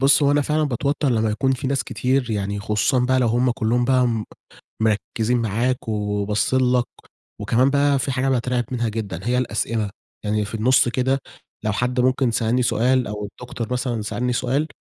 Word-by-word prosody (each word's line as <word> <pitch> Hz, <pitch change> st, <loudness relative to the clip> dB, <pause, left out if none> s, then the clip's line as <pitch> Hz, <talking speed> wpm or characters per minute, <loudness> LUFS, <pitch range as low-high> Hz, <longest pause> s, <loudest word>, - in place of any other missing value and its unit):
بُص 140 Hz, +2 st, +5 dB
هو 140 Hz, -, +4 dB
أنا 145 Hz, 0 st, +3 dB
فعلًا 155 Hz, +2 st, 0 dB
باتوتر 140 Hz, +2 st, 0 dB
لمّا 110 Hz, -3 st, +1 dB
يكون 130 Hz, +5 st, +1 dB
في 130 Hz, +1 st, -3 dB
ناس 135 Hz, 0 st, 0 dB
كتير 130 Hz, -1 st, 0 dB
يعني 100 Hz, -1 st, -2 dB
خصوصًا 110 Hz, +5 st, +1 dB
بقى 130 Hz, +1 st, +2 dB
لو 120 Hz, -, +2 dB
هُم 120 Hz, +3 st, +2 dB
كلّهم 120 Hz, +1 st, 0 dB
بقى 130 Hz, -1 st, +3 dB
م 110 Hz, -2 st, -1 dB, 0.6 s
مركزين 110 Hz, +2 st, 0 dB
معاك 115 Hz, +3 st, -1 dB
و -, -, -1 dB, 0.3 s
وباصين 105 Hz, +5 st, +1 dB
لك، 120 Hz, -1 st, +2 dB, 0.6 s
وكمان 125 Hz, +3 st, +3 dB
بقى 140 Hz, 0 st, +2 dB
في 135 Hz, -, -1 dB
حاجة 130 Hz, +1 st, 0 dB
باترعب 125 Hz, -1 st, 0 dB
منها 120 Hz, -2 st, -1 dB
جدًا 105 Hz, -6 st, -4 dB
هي 125 Hz, +2 st, +1 dB
الأسئلة، 115 Hz, -2 st, -1 dB, 0.4 s
يعني 105 Hz, 0 st, 0 dB
في 105 Hz, -, -6 dB
النُص 125 Hz, +3 st, +3 dB
كده 130 Hz, +2 st, 0 dB, 0.4 s
لو 110 Hz, -, 0 dB
حد 125 Hz, +4 st, -1 dB
ممكن 130 Hz, -1 st, +2 dB
سألني 115 Hz, +3 st, +1 dB
سؤال 125 Hz, +1 st, +2 dB
أو 105 Hz, 0 st, -4 dB
الدكتور 120 Hz, 0 st, -6 dB
مثلًا 120 Hz, -3 st, -2 dB
سألني 125 Hz, +4 st, -2 dB
سؤال 135 Hz, +5 st, 0 dB
125 Hz, 185 wpm, -22 LUFS, 110-130 Hz, 0.6 s, بُص